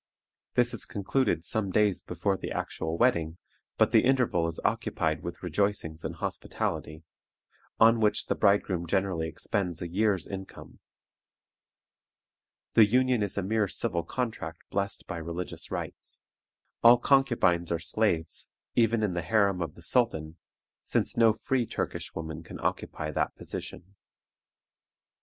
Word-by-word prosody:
This 120 0 +3
is 115 - -2
concluded 100 - 0
some 100 +3 -1
days 105 0 +2
before 90 +3 -1
the - - -6
actual 80 +1 -3
wedding, 85 -9 +2 0.4
but - - +4
the - - +5
interval 125 -10 +2
is 85 - -5
occupied 80 0 0
with 85 +1 -7
rejoicings 90 -3 -1
and 80 +1 -4
hospitality, 80 -1 -3 0.8
on 115 +1 +6
which 105 -1 +2
the - - 0
bridegroom 100 -4 +2
generally 95 -3 0
expends 90 0 -2
a 85 - -4
year's 100 +2 +1
income. 95 -1 -9 1.9
The 110 -2 +7
union 125 +1 +3
is 100 -1 -1
a 100 - 0
mere 105 +1 +1
civil 95 -3 -1
contract 85 -4 -4
blessed 100 -1 -2
by 85 - -5
religious 85 +2 -5
rites. - - -6 0.6
All 120 +1 +8
concubines 120 -11 +3
are 85 - +2
slaves, 85 -1 -1 0.3
even 115 -1 +3
in 100 -4 0
the 85 - -1
harem 100 0 +2
of 85 - -4
the 85 - -14
sultan, 85 -7 +1 0.4
since - - -1
no 115 -1 +6
free 120 +2 -1
Turkish - - -4
woman 80 -1 -5
can 80 - -10
occupy 75 0 -2
that - - -1
position. 95 +3 -7
95 Hz, 140 wpm, -28 LUFS, 85-110 Hz, 1.9 s, All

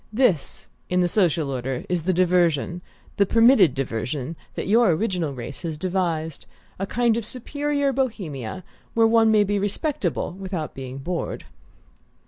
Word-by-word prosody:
"This, 215 - +1 0.2
in 180 0 +2
the 175 - +3
social 170 -6 +1
order, 130 0 -3
is 180 -2 0
the 185 - +3
diversion, 175 -2 +2 0.4
the 200 - +5
permitted 230 - +5
diversion, 135 +3 -3 0.2
that - - -3
your 225 +1 +5
original 180 -5 -1
race 130 +1 -7
has 160 -3 -4
devised: 165 -3 -2 0.3
a 195 - -2
kind 235 0 +2
of 235 - -2
superior 285 +4 -1
Bohemia, 185 - -3 0.3
where 225 0 +5
one 225 0 +5
may 215 -1 +5
be 205 0 0
respectable 205 - -1
without 185 -4 -5
being 130 0 -7
bored." 170 +5 -4
180 Hz, 145 wpm, -24 LUFS, 155-220 Hz, 0.4 s, the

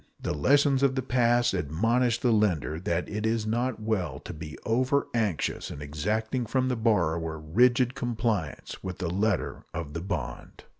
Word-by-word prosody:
The - - -2
lessons 140 - +3
of 135 -1 +3
the 130 - -1
past 120 -1 +3
admonish 115 - +1
the 125 - +3
lender 90 -8 +1
that 85 -2 -1
it 105 0 -4
is 110 -1 0
not 120 +2 -1
well 110 -4 -1
to - - -7
be 80 -1 -8
over 130 +5 +2
anxious 110 -8 -1
in - - -7
exacting 110 - -2
from 130 +2 +1
the 125 - +1
borrower 85 -8 +1
rigid 120 +11 +3
compliance 115 - -2
with 95 -1 -5
the 85 -2 -2
letter 100 0 0
of 80 -3 -5
the 80 - -4
bond. 90 -8 -5
110 Hz, 165 wpm, -28 LUFS, 85-120 Hz, -, lessons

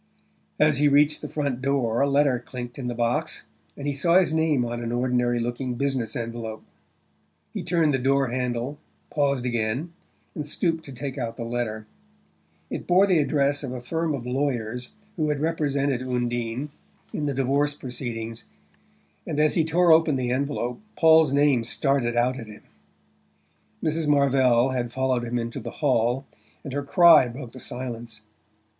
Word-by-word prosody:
As 150 -2 +4
he 145 - +4
reached 145 +1 +4
the - - -6
front 140 -4 -2
door 130 -4 +1
a 140 - +3
letter 140 -3 +3
clinked 120 0 -7
in 125 - -4
the 120 - -3
box, 120 +1 -1 0.3
and 140 - -6
he 145 - 0
saw 170 +6 +3
his 185 -4 +3
name 160 -6 +2
on 120 0 -4
an 115 0 -3
ordinary 120 0 +1
looking 120 +2 -3
business 135 -1 -1
envelope. 115 -2 -5 0.9
He - - -3
turned 165 -4 +2
the 130 - +1
door 135 0 +2
handle, 125 +3 -2 0.3
paused 140 -4 0
again, 120 +7 -2 0.4
and 150 -2 -5
stooped 165 +1 -1
to 140 - -9
take 135 +1 -5
out 115 -2 -4
the 120 - -4
letter. 115 -2 -3 0.9
It - - -5
bore 185 +2 +5
the 185 -5 +3
address 145 -1 +1
of 140 - -4
the 125 0 -5
firm 160 +5 -2
of 120 -3 -7
lawyers 125 -2 -2 0.2
who 155 -2 0
had 150 -1 -1
represented 145 -4 0
Undine 120 +1 -2 0.4
in 150 - -2
the 140 - -2
divorce 140 +2 +1
proceedings 115 -4 -6 0.8
and 150 - -2
as 155 0 +4
he 165 - +3
tore 170 +2 +3
open 160 -2 +4
the 125 -2 -1
envelope 130 +1 -2 0.2
Paul's 160 -3 +6
name 140 -4 +3
started 120 -1 0
out 125 +2 +1
at 115 - -8
him. 105 0 -12 1.2
Mrs. 160 0 0
Marvell 135 -3 +3
had 120 -2 -2
followed 130 -1 0
him 120 +1 -2
into 115 0 -4
the - - -6
hall, 130 -2 0 0.4
and 135 - -6
her 145 - -1
cry 165 -2 +6
broke 120 0 -8
the 130 - -11
silence. 120 -3 -6
130 Hz, 170 wpm, -25 LUFS, 120-145 Hz, 1.2 s, Paul's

